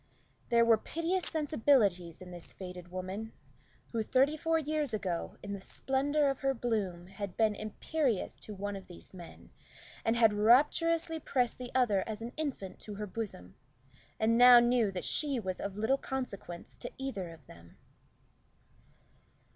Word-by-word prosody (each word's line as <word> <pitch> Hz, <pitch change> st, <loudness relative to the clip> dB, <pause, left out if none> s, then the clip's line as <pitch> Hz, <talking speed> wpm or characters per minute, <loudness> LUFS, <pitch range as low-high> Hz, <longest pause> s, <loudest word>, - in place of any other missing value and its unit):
There 235 Hz, -1 st, +5 dB
were 225 Hz, -2 st, +5 dB
piteous 340 Hz, +7 st, -1 dB
sensibilities 225 Hz, -, +1 dB
in 180 Hz, -, -11 dB
this 175 Hz, -1 st, -8 dB
faded 180 Hz, -2 st, -8 dB
woman, 185 Hz, +5 st, -5 dB, 0.6 s
who 230 Hz, -, 0 dB
thirty 270 Hz, +7 st, +3 dB
four 325 Hz, +1 st, +1 dB
years 300 Hz, -5 st, -1 dB
ago, 180 Hz, -5 st, -3 dB
in 200 Hz, 0 st, -4 dB
the 200 Hz, -, -6 dB
splendor 280 Hz, +7 st, +1 dB
of 275 Hz, -1 st, 0 dB
her 270 Hz, -1 st, +1 dB
bloom, 205 Hz, -8 st, -2 dB
had 195 Hz, 0 st, -7 dB
been 220 Hz, -2 st, +3 dB
imperious 220 Hz, -, -2 dB
to 210 Hz, -, -8 dB
one 205 Hz, +1 st, -4 dB
of 195 Hz, -, -9 dB
these 175 Hz, +1 st, -12 dB
men, 175 Hz, -2 st, -12 dB, 0.5 s
and 225 Hz, -, +2 dB
had 225 Hz, -2 st, +5 dB
rapturously 320 Hz, +9 st, +3 dB
pressed 250 Hz, -5 st, 0 dB
the 250 Hz, -1 st, -6 dB
other 215 Hz, -7 st, +3 dB
as 215 Hz, -1 st, -4 dB
an 240 Hz, +2 st, -6 dB
infant 275 Hz, -11 st, -4 dB
to 210 Hz, -, -8 dB
her 210 Hz, +1 st, -4 dB
bosom, 185 Hz, -, -6 dB, 0.7 s
and 230 Hz, +2 st, +3 dB
now 245 Hz, 0 st, +10 dB
knew 240 Hz, -2 st, +3 dB
that 185 Hz, -2 st, -4 dB
she 285 Hz, -4 st, +1 dB
was 185 Hz, -4 st, -4 dB
of 200 Hz, 0 st, -4 dB
little 225 Hz, +6 st, +2 dB
consequence 205 Hz, -10 st, -6 dB
to -, -, -6 dB
either 255 Hz, -10 st, -4 dB
of 160 Hz, -4 st, -13 dB
them. 85 Hz, -5 st, -16 dB
225 Hz, 160 wpm, -32 LUFS, 190-270 Hz, 0.7 s, now